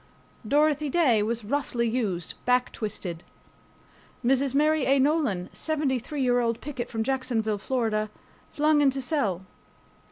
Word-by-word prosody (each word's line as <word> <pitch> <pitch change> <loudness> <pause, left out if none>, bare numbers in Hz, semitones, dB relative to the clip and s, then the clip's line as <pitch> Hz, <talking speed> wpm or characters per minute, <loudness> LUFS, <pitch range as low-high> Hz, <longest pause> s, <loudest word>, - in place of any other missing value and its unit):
Dorothy 295 +2 +2
Day 265 -9 +3
was 225 +1 -2
roughly 240 -1 -1
used 210 -8 -2
back 250 0 +2
twisted. 190 -6 -5 1.0
Mrs. 270 +1 +2
Mary 305 0 +3
A. 275 +1 +4
Nolan 270 - +1
(73 290 -3 -1
year 245 -1 +3
old 230 -1 0
picket 260 -4 -5
from 225 -1 -2
Jacksonville, 230 -5 -1
Florida) 215 -3 -1 0.4
flung 300 0 +3
into 275 -1 +2
cell. 235 - -1
255 Hz, 125 wpm, -26 LUFS, 220-285 Hz, 1.0 s, A